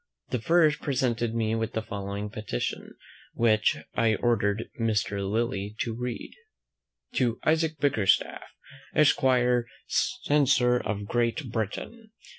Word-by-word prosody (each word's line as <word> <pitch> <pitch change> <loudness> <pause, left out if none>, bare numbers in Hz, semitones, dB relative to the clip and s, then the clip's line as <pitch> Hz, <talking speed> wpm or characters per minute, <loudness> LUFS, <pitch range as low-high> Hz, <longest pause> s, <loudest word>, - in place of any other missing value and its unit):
The 125 - -2
first 160 +1 +3
presented 120 -4 0
me 110 -1 0
with 115 0 -2
the 110 - -2
following 100 0 -5
petition, 105 - -4 0.4
which 110 -2 +3 0.2
I 115 -2 +2
ordered 110 -2 0
Mr. 110 -3 0
Lillie 105 -2 -1
to 115 - -2
read. 125 0 -5 0.8
"TO 120 -3 +1
ISAAC 160 0 +1
BICKERSTAFF, 125 -9 +2 0.5
ESQUIRE, 125 -5 +3 0.6
CENSOR 130 -4 +3
OF 105 -3 -3
GREAT 120 +4 -1
BRITAIN. 165 - -4
115 Hz, 110 wpm, -27 LUFS, 110-130 Hz, 0.8 s, first